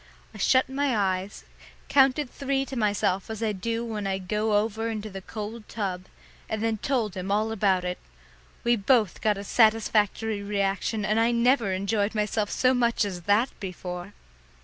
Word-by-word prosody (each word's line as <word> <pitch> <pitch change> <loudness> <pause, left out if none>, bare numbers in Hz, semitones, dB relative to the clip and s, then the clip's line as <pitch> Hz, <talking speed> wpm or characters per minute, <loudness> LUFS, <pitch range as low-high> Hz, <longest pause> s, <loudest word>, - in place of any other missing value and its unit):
I - - -11
shut 260 0 +4
my 270 -2 0
eyes, 190 0 -1 0.4
counted 275 +1 +4
three 275 +1 -2
to 270 - -7
myself 205 -4 0
as 220 0 -4
I 220 - +1
do 230 +4 -3
when 215 -3 -3
I 190 0 0
go 210 +3 0
over 220 +2 -1
into 215 -1 -5
the 195 0 -7
cold 215 +2 -7
tub, 185 -4 -3 0.4
and 220 0 -2
then 225 -1 0
told 235 -7 0
him 185 +1 -4
all 215 +2 +1
about 195 -4 +1
it. 180 0 -3 0.6
We 240 0 +4
both 215 -2 +2
got 210 -2 +2
a 200 - -5
satisfactory 220 -1 +2
reaction, 200 +1 -1
and 215 +2 +2
I 230 +1 +3
never 240 -2 +3
enjoyed 200 +3 0
myself 210 0 0
so 255 0 +2
much 235 -3 +2
as 185 -3 -5
that 220 +6 +4
before. 180 0 -6
215 Hz, 170 wpm, -26 LUFS, 200-230 Hz, 0.6 s, shut